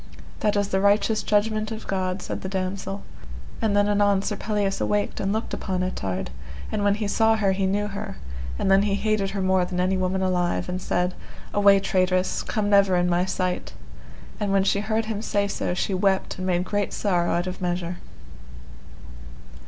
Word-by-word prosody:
That 210 Hz, -1 st, +1 dB
is 205 Hz, -1 st, +1 dB
the 190 Hz, -, +1 dB
righteous 210 Hz, +2 st, +3 dB
judgment 215 Hz, +1 st, +1 dB
of 220 Hz, 0 st, -6 dB
God, 185 Hz, -1 st, -2 dB
said -, -, -4 dB
the 190 Hz, -, -4 dB
damosel. 195 Hz, +1 st, -3 dB, 0.6 s
And 205 Hz, -2 st, +2 dB
then 205 Hz, 0 st, +4 dB
anon 205 Hz, -1 st, +3 dB
Sir 210 Hz, -, -2 dB
Pelleas 205 Hz, -1 st, -1 dB
awaked 205 Hz, 0 st, 0 dB
and 195 Hz, -, 0 dB
looked 220 Hz, +2 st, -2 dB
upon 185 Hz, -2 st, -2 dB
Ettard; 95 Hz, -, -3 dB, 0.4 s
and 205 Hz, -, -1 dB
when 200 Hz, 0 st, +3 dB
he 210 Hz, -1 st, -2 dB
saw 225 Hz, +2 st, +3 dB
her 205 Hz, -3 st, +2 dB
he 190 Hz, 0 st, 0 dB
knew 205 Hz, +2 st, 0 dB
her, 200 Hz, -, -6 dB, 0.4 s
and 195 Hz, -, +1 dB
then 195 Hz, 0 st, +6 dB
he 205 Hz, -1 st, +1 dB
hated 210 Hz, -1 st, 0 dB
her 195 Hz, -1 st, -2 dB
more 185 Hz, -1 st, +3 dB
than 180 Hz, 0 st, -3 dB
any 185 Hz, +1 st, +2 dB
woman 185 Hz, +1 st, 0 dB
alive, 180 Hz, -2 st, 0 dB
and 180 Hz, +1 st, -3 dB
said: 180 Hz, +1 st, 0 dB, 0.4 s
Away, 200 Hz, -1 st, +6 dB
traitress, 185 Hz, -1 st, +1 dB
come 215 Hz, -3 st, -2 dB
never 200 Hz, -2 st, +5 dB
in 175 Hz, 0 st, +2 dB
my 175 Hz, +1 st, +2 dB
sight. 185 Hz, -1 st, -2 dB, 0.7 s
And 205 Hz, -1 st, -1 dB
when 195 Hz, -1 st, +3 dB
she 200 Hz, -, +2 dB
heard 220 Hz, +2 st, 0 dB
him 215 Hz, -1 st, -3 dB
say 205 Hz, -2 st, 0 dB
so, 180 Hz, -2 st, -2 dB
she 195 Hz, -, -1 dB
wept 190 Hz, 0 st, +1 dB
and 185 Hz, -, -2 dB
made 180 Hz, -1 st, +1 dB
great 205 Hz, 0 st, -1 dB
sorrow 175 Hz, -4 st, +1 dB
out 175 Hz, +1 st, 0 dB
of 185 Hz, 0 st, -5 dB
measure. 175 Hz, -1 st, -2 dB
195 Hz, 190 wpm, -24 LUFS, 185-205 Hz, 0.7 s, then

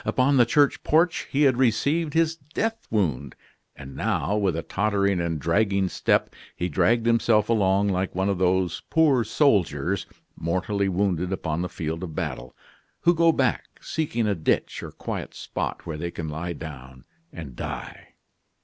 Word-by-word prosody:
Upon 135 Hz, +2 st, +2 dB
the 120 Hz, -2 st, +5 dB
church 145 Hz, +3 st, +3 dB
porch 165 Hz, +2 st, +2 dB
he 145 Hz, +2 st, +2 dB
had 130 Hz, -4 st, +4 dB
received 140 Hz, +6 st, +1 dB
his 165 Hz, 0 st, +2 dB
death 165 Hz, +10 st, -4 dB
wound; 75 Hz, -, -1 dB, 0.4 s
and 70 Hz, -1 st, -10 dB
now, 105 Hz, -, 0 dB
with 100 Hz, -5 st, +1 dB
a 80 Hz, -, -3 dB
tottering 100 Hz, -2 st, 0 dB
and 85 Hz, -2 st, -2 dB
dragging 100 Hz, +4 st, +1 dB
step, -, -, +1 dB, 0.2 s
he 90 Hz, -, -2 dB
dragged 115 Hz, +9 st, +2 dB
himself 115 Hz, -2 st, +3 dB
along 100 Hz, -2 st, +2 dB
like 95 Hz, -1 st, -1 dB
one 95 Hz, +1 st, 0 dB
of 100 Hz, -3 st, 0 dB
those 90 Hz, -2 st, +1 dB
poor 150 Hz, -7 st, +4 dB
soldiers, 100 Hz, -, +1 dB, 0.3 s
mortally 95 Hz, +4 st, -1 dB
wounded 90 Hz, -1 st, 0 dB
upon 85 Hz, -3 st, -2 dB
the 90 Hz, -, -3 dB
field 80 Hz, -1 st, -4 dB
of 85 Hz, -4 st, -6 dB
battle, 60 Hz, -3 st, -4 dB, 0.5 s
who 175 Hz, -, +4 dB
go 165 Hz, 0 st, +4 dB
back, 130 Hz, -6 st, 0 dB
seeking 120 Hz, -8 st, -2 dB
a 105 Hz, -, +2 dB
ditch 80 Hz, -5 st, -1 dB
or -, -, -7 dB
quiet -, -, -6 dB
spot -, -, -4 dB
where 80 Hz, -3 st, -4 dB
they 85 Hz, +3 st, -3 dB
can 85 Hz, -2 st, -6 dB
lie 85 Hz, +3 st, -4 dB
down 65 Hz, -5 st, -10 dB, 0.3 s
and 75 Hz, -7 st, -9 dB
die. -, -, -7 dB
100 Hz, 165 wpm, -25 LUFS, 85-120 Hz, 0.5 s, the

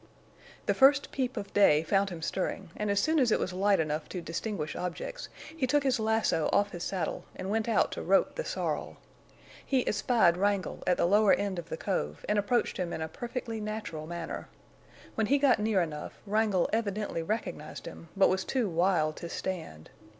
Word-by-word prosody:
The -, -, +2 dB
first 275 Hz, +1 st, +5 dB
peep 255 Hz, -2 st, -2 dB
of 200 Hz, -, -5 dB
day 160 Hz, -7 st, +5 dB
found 195 Hz, +4 st, +2 dB
him 170 Hz, -3 st, -7 dB
stirring, 190 Hz, 0 st, -3 dB
and 210 Hz, -1 st, -2 dB
as 200 Hz, 0 st, +2 dB
soon 315 Hz, +8 st, +2 dB
as 250 Hz, -4 st, +3 dB
it -, -, +3 dB
was 185 Hz, -, -2 dB
light 195 Hz, +2 st, +3 dB
enough 155 Hz, -1 st, -2 dB
to 185 Hz, -, -4 dB
distinguish 170 Hz, -1 st, -4 dB
objects, -, -, -5 dB, 0.3 s
he 275 Hz, -5 st, 0 dB
took 290 Hz, +2 st, +2 dB
his 260 Hz, -3 st, +2 dB
lasso 220 Hz, -7 st, +1 dB
off 205 Hz, 0 st, +2 dB
his 175 Hz, 0 st, -6 dB
saddle 185 Hz, -5 st, -3 dB
and 185 Hz, +1 st, -4 dB
went 225 Hz, +1 st, 0 dB
out -, -, +2 dB
to -, -, -4 dB
rope -, -, +3 dB
the -, -, -3 dB
sorrel. -, -, -3 dB, 0.7 s
He 265 Hz, -3 st, 0 dB
espied 210 Hz, -6 st, +3 dB
Wrangle 200 Hz, 0 st, 0 dB
at 180 Hz, -, +3 dB
the -, -, +2 dB
lower 205 Hz, +3 st, +5 dB
end 200 Hz, -3 st, -1 dB
of 170 Hz, -1 st, -9 dB
the -, -, -4 dB
cove 75 Hz, -, -3 dB
and 210 Hz, 0 st, +2 dB
approached 235 Hz, +4 st, 0 dB
him 180 Hz, -2 st, -2 dB
in -, -, -4 dB
a -, -, -3 dB
perfectly 230 Hz, +4 st, -5 dB
natural 210 Hz, -8 st, -5 dB
manner. 170 Hz, -1 st, -5 dB, 0.7 s
When 220 Hz, -2 st, 0 dB
he 280 Hz, -, +4 dB
got 275 Hz, -5 st, +4 dB
near 210 Hz, -3 st, +2 dB
enough, 150 Hz, -2 st, -6 dB
Wrangle 210 Hz, -3 st, +2 dB
evidently 210 Hz, -5 st, -1 dB
recognized 165 Hz, -4 st, -4 dB
him, 165 Hz, -, -10 dB
but 195 Hz, -, +6 dB
was 190 Hz, 0 st, +1 dB
too 255 Hz, -5 st, 0 dB
wild 165 Hz, -3 st, +1 dB
to 170 Hz, -, -6 dB
stand. 165 Hz, -, -5 dB
200 Hz, 195 wpm, -30 LUFS, 170-225 Hz, 0.7 s, but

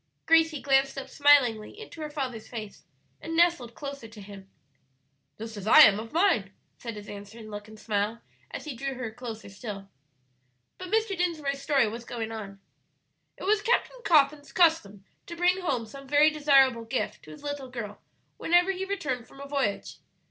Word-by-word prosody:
Gracie 325 Hz, -2 st, +3 dB
glanced 270 Hz, 0 st, +2 dB
up 265 Hz, -1 st, -5 dB
smilingly 275 Hz, -, +3 dB
into 435 Hz, -7 st, -10 dB
her 305 Hz, -, -4 dB
father's 260 Hz, -7 st, -5 dB
face 215 Hz, -4 st, -8 dB, 0.4 s
and 325 Hz, 0 st, -4 dB
nestled 335 Hz, -9 st, +2 dB
closer 280 Hz, -5 st, -7 dB
to 220 Hz, -1 st, -14 dB
him. 195 Hz, -1 st, -12 dB, 0.9 s
"Just 225 Hz, 0 st, -8 dB
as 205 Hz, 0 st, -7 dB
I -, -, +9 dB
am 205 Hz, 0 st, +7 dB
of 225 Hz, +1 st, -8 dB
mine," 325 Hz, -, +2 dB, 0.2 s
said 230 Hz, -2 st, -7 dB
his 210 Hz, 0 st, -10 dB
answering 210 Hz, +2 st, -10 dB
look 205 Hz, 0 st, -7 dB
and 215 Hz, 0 st, -13 dB
smile 210 Hz, +1 st, -1 dB, 0.3 s
as -, -, -7 dB
he 295 Hz, -4 st, -5 dB
drew 270 Hz, +2 st, -4 dB
her 245 Hz, -3 st, -5 dB
closer 225 Hz, -1 st, -8 dB
still. 195 Hz, -1 st, -8 dB, 0.9 s
But 365 Hz, -1 st, -7 dB
Mr. 440 Hz, -1 st, +1 dB
Dinsmore's 310 Hz, -6 st, -2 dB
story 275 Hz, -5 st, +2 dB
was 230 Hz, +3 st, -6 dB
going 230 Hz, -2 st, -5 dB
on. 200 Hz, -3 st, -7 dB, 0.8 s
"It -, -, -10 dB
was 410 Hz, +2 st, +2 dB
Captain 485 Hz, +3 st, 0 dB
Coffin's 290 Hz, -, +3 dB
custom 315 Hz, -, +2 dB, 0.2 s
to 340 Hz, -, -7 dB
bring 360 Hz, +2 st, +2 dB
home 265 Hz, -10 st, -1 dB
some 275 Hz, +5 st, -12 dB
very 295 Hz, +2 st, +5 dB
desirable 270 Hz, -6 st, +4 dB
gift 225 Hz, -3 st, -3 dB
to -, -, -14 dB
his 155 Hz, -, -12 dB
little 285 Hz, -2 st, -5 dB
girl 225 Hz, -5 st, -7 dB, 0.4 s
whenever 350 Hz, +3 st, +3 dB
he 380 Hz, 0 st, -4 dB
returned 270 Hz, -, -3 dB
from 275 Hz, -, -16 dB
a 280 Hz, -, -8 dB
voyage. 275 Hz, -8 st, -2 dB
265 Hz, 175 wpm, -27 LUFS, 220-310 Hz, 0.9 s, I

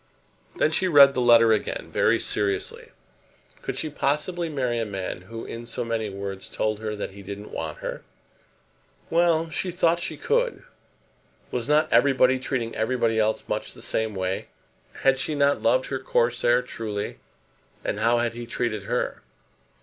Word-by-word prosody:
Then 155 Hz, -, +2 dB
she 185 Hz, +4 st, +1 dB
read 140 Hz, -5 st, +8 dB
the 125 Hz, -, 0 dB
letter 115 Hz, -2 st, +6 dB
again 110 Hz, -, -3 dB
very -, -, +3 dB
seriously. 100 Hz, -1 st, -2 dB, 0.7 s
Could -, -, -4 dB
she 160 Hz, -, -1 dB
possibly 150 Hz, +4 st, -1 dB
marry 125 Hz, -5 st, -1 dB
a -, -, 0 dB
man 95 Hz, -4 st, -4 dB
who 115 Hz, 0 st, -6 dB
in 120 Hz, +1 st, -7 dB
so 120 Hz, -, -4 dB
many 115 Hz, -2 st, -2 dB
words 100 Hz, 0 st, -6 dB
told 110 Hz, -1 st, -1 dB
her 110 Hz, -1 st, -3 dB
that 105 Hz, -, -5 dB
he 100 Hz, +1 st, -11 dB
didn't 100 Hz, +2 st, -8 dB
want 80 Hz, -2 st, -4 dB
her? -, -, -4 dB, 1.1 s
Well; 165 Hz, -1 st, +3 dB
she 185 Hz, -, -1 dB
thought 170 Hz, -1 st, +2 dB
she -, -, -4 dB
could. 485 Hz, +1 st, 0 dB, 0.9 s
Was 120 Hz, -1 st, -2 dB
not 150 Hz, +1 st, +4 dB
everybody 130 Hz, +1 st, +4 dB
treating 120 Hz, -3 st, -2 dB
everybody 115 Hz, -1 st, +1 dB
else 110 Hz, 0 st, +1 dB
much -, -, -3 dB
in -, -, -19 dB
the -, -, -12 dB
same 110 Hz, -2 st, -1 dB
way? 95 Hz, 0 st, -2 dB, 0.6 s
Had 135 Hz, 0 st, +4 dB
she 150 Hz, -, -2 dB
not 140 Hz, 0 st, +2 dB
loved 130 Hz, +3 st, +3 dB
her 135 Hz, -, -2 dB
Corsair 120 Hz, -1 st, +2 dB
truly, 110 Hz, -4 st, -5 dB, 0.7 s
and 105 Hz, -, -1 dB
how 115 Hz, +2 st, +3 dB
had 120 Hz, -1 st, 0 dB
he 120 Hz, 0 st, -7 dB
treated 110 Hz, -4 st, -2 dB
her? -, -, -2 dB
120 Hz, 165 wpm, -25 LUFS, 110-140 Hz, 1.1 s, read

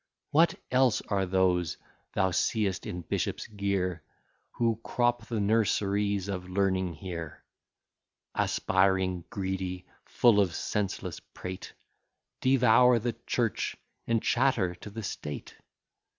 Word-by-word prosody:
What 165 Hz, +3 st, +4 dB, 0.2 s
else 125 Hz, -3 st, +3 dB
are 95 Hz, -2 st, +1 dB
those 90 Hz, -2 st, +2 dB, 0.4 s
thou 95 Hz, 0 st, +2 dB
seest 95 Hz, +1 st, 0 dB
in 90 Hz, -, -4 dB
bishop's -, -, -2 dB
gear, 100 Hz, -4 st, -1 dB, 0.5 s
Who 115 Hz, -2 st, +1 dB
crop 120 Hz, -2 st, 0 dB
the 115 Hz, -3 st, -2 dB
nurseries 100 Hz, -2 st, +1 dB
of 90 Hz, -2 st, -4 dB
learning 95 Hz, -2 st, 0 dB
here; 85 Hz, -2 st, -7 dB, 0.9 s
Aspiring, 95 Hz, -2 st, +1 dB
greedy, 95 Hz, -2 st, -3 dB, 0.2 s
full 115 Hz, -4 st, +4 dB
of 95 Hz, -5 st, +2 dB
senseless 105 Hz, -2 st, -2 dB
prate, 90 Hz, 0 st, -8 dB, 0.7 s
Devour 125 Hz, -1 st, +5 dB
the 115 Hz, +1 st, -1 dB
church, 115 Hz, -3 st, 0 dB, 0.3 s
and 115 Hz, -1 st, +1 dB
chatter 120 Hz, -8 st, +2 dB
to 90 Hz, +4 st, -10 dB
the 110 Hz, +2 st, -7 dB
state? 75 Hz, -6 st, -6 dB
100 Hz, 110 wpm, -29 LUFS, 95-115 Hz, 0.9 s, Devour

